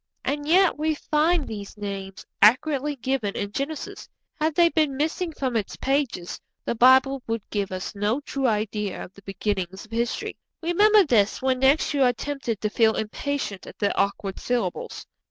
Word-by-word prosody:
And 290 +2 -2
yet 355 -1 +4
we 310 0 +1
find 310 +1 +1
these 205 -1 -7
names 195 -2 -6 0.2
accurately 280 +6 +4
given 255 -5 -2
in 205 0 -3
Genesis; 280 +6 -5 0.3
had 310 0 0
they 340 0 +5
been 305 -5 +1
missing 325 +4 -1
from 260 -5 -3
its 215 -3 -2
pages, 270 -10 -2 0.2
the - - 0
Bible 260 +3 +5
would 225 -2 -2
give 200 -2 -2
us 185 0 -4
no 210 +5 0
true 275 -2 -1
idea 210 -2 -2
of 185 - -12
the 200 - -16
beginnings 195 -1 -3
of 220 - -23
history. 235 +1 -2 0.3
Remember 415 +5 +5
this 220 - +2
when 260 -1 0
next 270 +4 +3
you 285 - +1
are 250 -2 +5
tempted 270 -5 -4
to 215 - 0
feel 220 -1 +3
impatient 220 -2 -3
at - - -11
the 205 -2 0
awkward 200 -1 -1
syllables. 235 -8 -3
250 Hz, 170 wpm, -25 LUFS, 205-290 Hz, 0.3 s, they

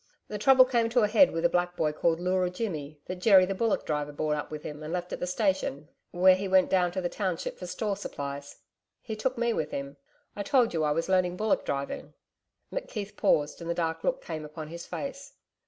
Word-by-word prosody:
The 210 - -4
trouble 260 +3 +7
came 235 -3 +1
to 240 +1 +3
a 210 - +4
head 235 +7 +6
with 165 +1 -2
a - - +8
black 175 +1 0
boy, 155 -2 +1
called 165 +2 +1
Leura 180 0 +1
Jimmy, 155 -7 -5
that 185 - -5
Jerry 190 0 +6
the 195 - -2
bullock 225 +3 0
driver 150 -1 -2
brought 150 +1 -1
up 150 - -4
with 155 -1 -7
him 150 0 -7
and 155 +1 -6
left 180 0 -3
at - - -4
the 180 - -2
station 185 -6 -1 0.2
where 185 +1 +6
he 190 +2 -2
went 190 -1 +4
down 180 -2 +3
to 185 - -2
the 175 - 0
township 185 -2 -3
for 180 - -6
store 205 +2 -2
supplies 140 -7 -6 0.4
He 220 - -4
took 250 +4 -2
me 235 0 +1
with 155 -6 -2
him 140 0 -5 0.4
I 205 - -4
told 250 -1 +3
you 160 -2 0
I 150 - +2
was 165 +2 0
learning 185 -1 +2
bullock 215 +1 +1
driving....' 140 0 -4 0.6
McKeith 210 - -5
paused, 150 -2 +1
and 170 - -6
the 170 - 0
dark 165 -1 -2
look - - 0
came 155 - -5
upon 155 0 -8
his 170 +1 -8
face. 275 0 -6
180 Hz, 230 wpm, -28 LUFS, 155-210 Hz, 0.6 s, a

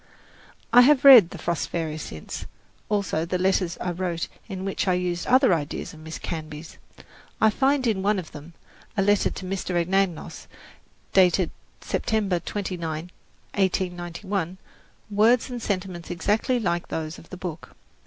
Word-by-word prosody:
I 245 - +10
have 280 +2 +5
read 245 -11 +10
"The - - -8
Frost 170 -2 -2
Fairies" 160 -2 -3
since, 80 - -7 0.4
also 200 -6 0
the 180 +2 -1
letters 185 -1 +1
I 180 - -2
wrote 175 -1 -3 0.2
in 190 -1 -5
which 195 0 -2
I 185 - +3
used 180 -1 -2
other 255 -5 +5
ideas 150 -3 -3
of 155 - -13
Miss 160 +1 -7
Canby's. 155 -1 -7 0.6
I 220 - +5
find 270 +3 +2
in 215 -5 +1
one 205 +1 +2
of 180 -4 -6
them, 150 +3 -11 0.4
a 195 - +3
letter 205 0 +3
to 190 - -7
Mr. 185 -1 -3
Anagnos, 185 0 -1 0.7
dated 185 -1 +4 0.3
September 205 -5 0
29, 170 -4 -4 0.4
1891, 185 -1 -2 0.5
words 225 +5 +3
and 245 -1 -5
sentiments 185 -5 -3
exactly 210 +7 0
like 175 -5 -1
those 160 0 -4
of 165 - -17
the 185 - -8
book. 175 -3 -7
185 Hz, 150 wpm, -25 LUFS, 170-205 Hz, 0.7 s, I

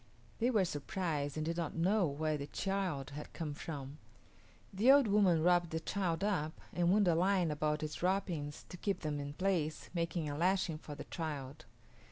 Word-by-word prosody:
They 240 +2 +3
were 215 -7 +3
surprised 150 -2 -2
and 155 - -1
did 165 +1 -2
not 165 -3 -2
know 185 +3 +3
where 155 +2 -1
the 140 -1 -4
child 185 -8 -2
had 150 +1 -7
come 155 -3 -4
from. 145 -1 -6 0.7
The 220 +7 +6
old 280 -1 +7
woman 195 -6 +4
wrapped 175 -1 +4
the 160 - -2
child 180 0 -1
up 160 -7 -1
and 175 -1 +2
wound 205 -1 +4
a 170 - +5
line 180 -1 +2
about 150 0 0
its 155 0 -4
wrappings 175 -6 -1
to 180 - -8
keep 200 +2 -1
them 150 -2 -2
in 145 0 -5
place, 170 -3 -1
making 170 -2 -1
a 145 - -3
lashing 175 -1 +1
for 150 -2 -8
the - - -7
child. 145 -5 -5
165 Hz, 190 wpm, -35 LUFS, 150-190 Hz, 0.7 s, old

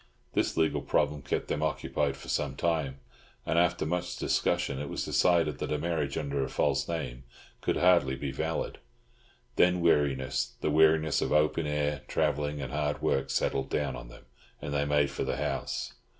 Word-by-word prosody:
This - - 0
legal 80 -1 +2
problem 75 0 0
kept 65 - -2
them 75 - -2
occupied 75 -2 -1
for - - -12
some 70 -2 -1
time; 70 -4 -1 0.4
and, 85 - +2
after 85 -1 +2
much 85 +2 -2
discussion, 70 - 0
it 70 -1 -4
was - - -3
decided 85 -4 +2
that - - -3
a 75 - +1
marriage 75 -3 -1
under 70 -2 -1
a 65 - -3
false - - +1
name 65 -7 -4 0.4
could - - 0
hardly 85 -7 +4
be 70 0 -4
valid. 80 +4 -3 0.8
Then 90 0 +4
weariness, 70 -7 +1
the 75 - +1
weariness 80 0 +4
of - - -1
open 75 +1 +2
air, 75 -1 -1
travelling, 75 -1 0
and 65 - -6
hard 75 0 -1
work, 70 0 +1
settled 65 0 0
down - - -1
on - - -8
them, - - -14 0.3
and 75 - -5
they 70 0 +1
made 75 -1 +2
for - - -3
the - - -2
house. 70 -2 -3
75 Hz, 180 wpm, -29 LUFS, 70-80 Hz, 0.8 s, hardly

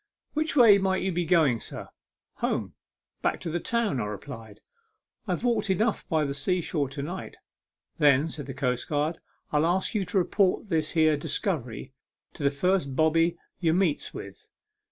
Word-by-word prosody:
" - - -53
Which 310 0 -1
way 225 -7 +7
might 190 -1 0
you 190 - 0
be 175 0 -1
going, 155 -8 +3
sir? - - -7 0.2
" - - -66
" - - -67
Home - - -2 0.5
back - - 0
to 165 - -4
the 175 - -1
town," 225 - 0
I - - -2
replied; 105 0 -8 0.4
" 430 - -47
I've 180 +2 -2
walked 235 -4 +1
enough 215 +4 0
by 160 -4 +2
the 140 - -2
sea 180 +6 0
shore 150 -5 -1
to 140 +1 -5
night." 175 +6 -6 0.3
" - - -53
Then," 145 0 +5
said 150 -4 -6
the 135 - -6
coastguard, 145 +4 -1 0.2
" - - -43
I'll 150 +2 +3
ask 185 +6 0
you 210 -3 +1
to 180 +3 -2
report 190 +2 +1
this 160 -3 0
here 155 -2 +4
discovery 140 - -3 0.4
to - - -11
the 140 - +3
first 140 -1 0
bobby 165 +3 +3 0.2
ye 165 -3 +2
meets 175 -4 +1
with. - - -10
165 Hz, 195 wpm, -27 LUFS, 140-190 Hz, 0.5 s, way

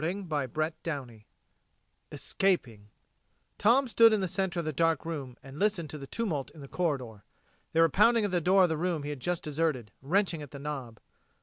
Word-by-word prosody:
CHAPTER 155 -3 -2
SIXTEEN 125 -9 -5 0.9
ESCAPING 120 - -1 0.7
Tom 255 +5 +4
stood 230 -1 +6
in 215 - +2
the 190 - 0
center 185 0 -1
of 170 - -1
the 155 - -2
dark 165 +3 +1
room 140 -7 -5
and 135 +2 -10
listened 190 -7 0
to 150 - -7
the 135 - -8
tumult 165 - -2
in 155 - -11
the 140 - -9
corridor. 130 - -2 0.5
They 165 - +4
were 165 - +7
pounding 225 - +4
at 205 - -2
the 175 -1 +1
door 190 +3 +5
of 180 - +3
the 160 - -1
room 170 -2 -1
he 145 - -4
had 145 - -6
just 175 +5 -2
deserted, 150 -7 -1
wrenching 170 +2 +1
at 145 - -8
the 140 - -9
knob. 135 -6 -6
160 Hz, 195 wpm, -29 LUFS, 140-185 Hz, 0.9 s, were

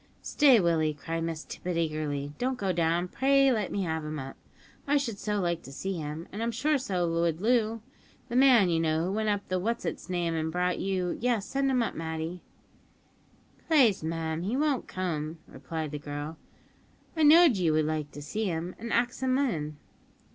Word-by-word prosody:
"Stay, 270 -6 +5
Willie," 160 -4 +1
cried 165 +3 -4
Miss 165 -2 -4
Tippet 180 -1 -5
eagerly; 150 -3 -2
"don't 255 +1 -1
go 195 -5 0
down. 170 +1 +1
Pray 275 +5 +3
let 215 -6 -1
me 200 - -1
have 160 -2 -2
him 155 0 -4
up; 135 -1 -7 0.5
I 290 +1 +4
should 235 -8 -3
so 210 0 -1
like 170 -2 -1
to 135 - -11
see 190 +7 -4
him, 155 +2 -5
and 210 - -5
I'm 230 - 0
sure 285 +6 +1
so 185 -9 -1
would 165 -1 0
Loo; 225 0 +1 0.4
the 240 - -5
man, 250 -8 +6
you 165 - +2
know, 160 0 +1
who 185 - -1
went 215 +1 0
up 205 -1 -1
the 185 0 0
what's 230 +5 -2
its - - -5
name, 175 -2 -1
and 160 0 -1
brought 180 +1 0
you 185 -2 -1
yes, 235 -4 +1
send 275 0 0
him 255 -3 +2
up, - - -3
Matty." 160 +2 -4 1.3
"Plaze, 265 - +4
mim, 160 0 -2
he 210 +8 -1
won't 290 -3 0
come," 165 -4 -3
replied 150 +3 -5
the 150 - -4
girl, 145 +2 -6 0.8
"I 320 - -1
know'd 310 - +7
ye 175 -3 +2
would 155 0 +2
like 155 -1 -2
to 145 - -8
see 215 +9 -3
him, 175 -1 -3
an' 230 +2 -5
axed 240 +2 0
him 260 0 +2
in." 155 - -1
180 Hz, 200 wpm, -28 LUFS, 160-235 Hz, 1.3 s, know'd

